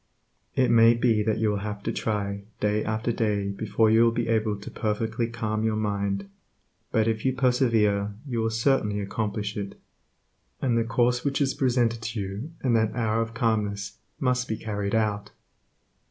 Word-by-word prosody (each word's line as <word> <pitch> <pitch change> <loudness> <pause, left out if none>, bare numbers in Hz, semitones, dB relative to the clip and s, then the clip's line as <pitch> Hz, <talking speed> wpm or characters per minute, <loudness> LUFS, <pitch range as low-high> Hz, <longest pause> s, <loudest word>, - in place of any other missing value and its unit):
It 130 -2 +3
may 115 0 +6
be 115 -2 +2
that 110 0 0
you 110 -1 +1
will 105 - -1
have 105 0 -5
to - - -1
try 100 -2 -2 0.2
day 105 +1 +1
after 110 +2 -1
day 105 -3 0
before 110 +2 +1
you 110 +1 +5
will 115 - +4
be 115 0 -2
able 110 -2 +1
to 105 - -9
perfectly 110 +2 -1
calm 110 -2 -2
your 110 -1 +1
mind, 100 -2 -1 0.6
but 110 0 +2
if 110 -1 -1
you 130 - +2
persevere 115 -6 +2
you 120 -5 -2
will 115 0 +1
certainly 110 -3 +1
accomplish 105 +1 -3
it. 100 -1 -5 0.8
And 125 -3 +1
the 115 - +3
course 120 +2 +1
which 140 -1 0
is 135 -2 +1
presented 120 -3 +1
to 115 0 -4
you 100 +10 -5
in 125 -3 +2
that 110 -1 +2
hour 115 -2 +1
of 115 0 -4
calmness 105 -4 -1 0.2
must 125 -1 +1
be 110 - -2
carried 105 -2 -2
out. 105 -2 0
110 Hz, 180 wpm, -26 LUFS, 105-115 Hz, 0.8 s, may